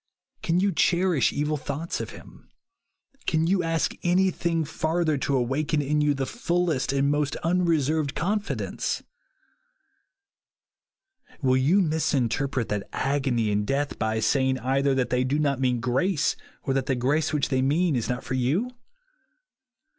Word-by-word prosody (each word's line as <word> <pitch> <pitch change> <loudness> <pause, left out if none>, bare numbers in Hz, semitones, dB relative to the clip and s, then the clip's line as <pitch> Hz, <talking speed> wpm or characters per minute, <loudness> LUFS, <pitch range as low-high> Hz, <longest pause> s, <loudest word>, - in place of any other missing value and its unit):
Can 170 +2 +1
you 200 +1 +2
cherish 175 -3 +2
evil 150 +1 -1
thoughts 145 +4 -4
of - - -5
him? - - -14 0.8
Can 160 -1 +2
you 185 +2 +2
ask 165 -1 0
anything 175 -2 +1
farther 160 +1 0
to 140 +1 0
awaken 140 +5 0
in 150 +1 +1
you 145 -1 +2
the 135 0 -2
fullest 175 - -1
and 140 +1 +1
most 145 -1 0
unreserved 160 -4 +1
confidence? 205 +5 -2 2.4
Will 130 -1 +3
you 165 +10 +3
misinterpret 140 -5 0
that 105 -1 -3
agony 130 -5 0
and 105 0 +1
death 140 +6 -2
by 110 0 0
say 130 +4 +2
ing 130 - +1
either 135 +2 +1
that 130 -1 0
they 125 0 +2
do 135 +3 0
not 140 -3 0
mean 125 -2 +1
grace, 135 +8 +1 0.3
or 135 - -1
that 135 -1 -1
the 130 - +1
grace 140 +6 +1
which 150 -2 0
they 130 -1 +1
mean 150 +4 +2
is 120 - -2
not 125 0 -2
for - - -5
you 145 - 0
145 Hz, 150 wpm, -25 LUFS, 130-165 Hz, 2.4 s, Will